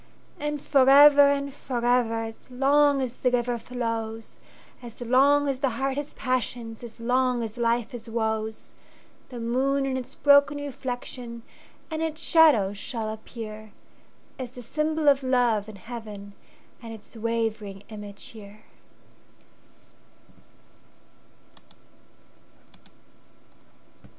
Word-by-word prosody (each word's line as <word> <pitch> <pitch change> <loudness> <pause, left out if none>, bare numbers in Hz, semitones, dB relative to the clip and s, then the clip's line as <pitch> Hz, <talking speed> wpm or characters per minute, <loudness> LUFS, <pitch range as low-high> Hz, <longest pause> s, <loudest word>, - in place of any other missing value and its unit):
And 295 0 -2
forever 285 +1 +7
and 280 -1 -1
forever, 245 -3 0
As 225 +2 -9
long 280 +2 +3
as 250 -1 -5
the 250 - +1
river 245 -1 0
flows, 225 -2 -4 0.4
As 235 -2 -11
long 275 +4 +4
as 270 -2 -1
the 270 -1 +1
heart 270 0 -1
has 290 +1 -5
passions, 245 -3 -3
As 235 0 -10
long 250 0 +1
as 220 -1 -6
life 235 -1 +1
has 235 -1 -9
woes; 220 -1 -3 0.6
The 245 -2 -7
moon 265 +4 0
and 260 -1 -1
its 260 +1 -8
broken 285 0 +5
reflectionAnd 250 -3 -6 0.5
its 315 0 -2
shadows 275 - +4
shall 220 -3 -4
appear, 215 -1 -9 0.7
As 255 -2 -4
the 250 0 -11
symbol 305 +4 -1
of 280 -1 +5
love 245 -5 +1
in 215 - -10
heaven, 210 -1 -9 0.5
And 230 -2 -8
its 225 +1 -12
wavering 220 -3 -3
image 205 -2 -9
here. 210 -1 -13
245 Hz, 110 wpm, -26 LUFS, 225-275 Hz, 0.7 s, forever